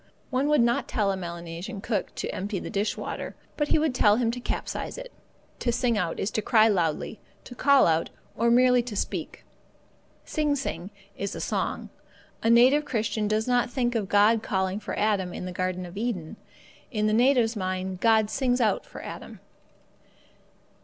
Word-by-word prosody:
One 265 +2 +1
would 300 -3 +4
not 235 0 +1
tell 205 -3 +1
a - - -1
Melanesian 170 +3 -6
cook 215 +1 -3
to - - -3
empty 200 +1 -3
the - - -6
dish 205 +2 -1
water, - - -5 0.2
but 295 - 0
he - - +3
would 305 -3 +1
tell 210 -4 +4
him 230 0 +1
to 245 - -5
capsize - - -4
it. - - -8 0.5
To 240 - 0
sing 245 -1 +1
out 180 -5 -1
is 200 - -1
to 215 - -1
cry 220 0 +5
loudly, 175 0 0 0.2
to - - -10
call 280 +2 +5
out, 165 0 +1 0.3
or 235 +2 +2
merely 250 +1 +5
to 235 -3 -7
speak. - - -4 0.8
Sing 300 -2 0
sing 190 - -4 0.3
is 200 0 -4
a - - -5
song. - - -2 0.5
The 225 - +1
native 255 +6 +6
Christian 220 -4 -1
does 215 +2 0
not 245 -1 +2
think 245 -1 0
of 210 -5 -2
God 210 +2 +4
calling 190 -1 -1
for 210 - -5
Adam 200 -4 0
in - - -5
the 180 - -5
Garden 185 0 -2
of 175 +1 -10
Eden; 210 -4 -3 0.5
in 215 -3 -1
the 215 - +2
native's 240 -1 +3
mind, 185 -1 -3
God 220 -1 +3
sings 255 -2 +1
out 225 -3 +1
for - - -10
Adam. - - -8
220 Hz, 185 wpm, -26 LUFS, 190-245 Hz, 0.8 s, native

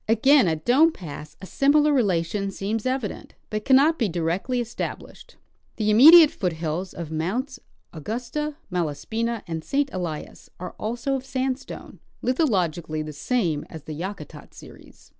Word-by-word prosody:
Again 245 +2 +5
at 160 -2 -2
Dome 300 +7 +5
pass 155 - -10
a - - -5
similar 295 +7 +3
relation 195 -4 0
seems 210 +4 -3
evident, 255 -5 -4 0.2
but 215 0 -3
cannot 280 +5 +4
be 225 -5 +1
directly 175 +9 -1
established. 240 0 -6 0.4
The 215 -1 0
imme 255 +8 +9
diate 330 -3 +9
foothills 170 0 -3
of 165 -2 -6
Mounts 240 - -3 0.3
Augusta, 245 - -4 0.2
Malaspina, 215 +7 -2
and 165 -3 -5
St. 280 - -1
Elias 170 -5 -6
are 180 - -7
also 235 +5 -2
of 265 -1 -2
sandstone, 265 0 -4 0.2
lithologically 175 - 0
the 155 - -7
same 165 - -1
as 160 -3 -10
the 155 - -7
Yakutat 185 +7 -8
series. - - -15
215 Hz, 140 wpm, -24 LUFS, 165-260 Hz, 0.4 s, imme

